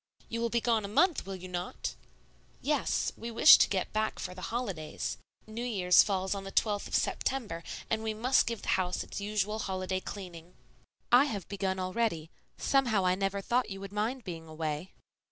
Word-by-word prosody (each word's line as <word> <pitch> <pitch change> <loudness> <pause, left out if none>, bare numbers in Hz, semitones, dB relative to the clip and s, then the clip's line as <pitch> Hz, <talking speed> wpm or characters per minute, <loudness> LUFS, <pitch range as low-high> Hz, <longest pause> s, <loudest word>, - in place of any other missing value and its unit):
"You 230 0 -3
will 235 - +1
be 235 0 +1
gone 230 -2 +2
a - - -3
month, 300 - +2
will 195 - -4
you 185 0 -8
not?" 180 0 -4 0.7
"Yes; 290 -2 0
we 230 - -6
wish 235 +6 +8
to - - +4
get 190 -2 -1
back 215 0 0
for 180 - -5
the 185 - -10
holidays. 155 - -3 0.3
New 220 +2 -6
Year's 190 -7 +5
falls 190 -2 0
on 200 -1 -5
the 195 - -7
12th 205 -1 +1
of - - -2
September, 215 -11 -1 0.2
and 220 0 0
we 220 -1 -2
must 255 +4 +3
give 230 -2 -3
the - - -4
house 180 0 -2
its - - -7
usual 210 +1 -1
holiday 185 -2 -2
cleaning." 180 -3 -9 0.6
"I 250 +3 +7
have 205 - -4
begun 195 -1 -2
already. 185 -4 -1 0.3
Somehow 240 -8 +2
I 180 - +4
never 195 +1 -1
thought 245 +4 +1
you 195 -1 -6
would 195 0 -8
mind 230 +5 -1
being 165 -4 -7
away." 155 +2 -4
200 Hz, 190 wpm, -30 LUFS, 185-230 Hz, 0.7 s, wish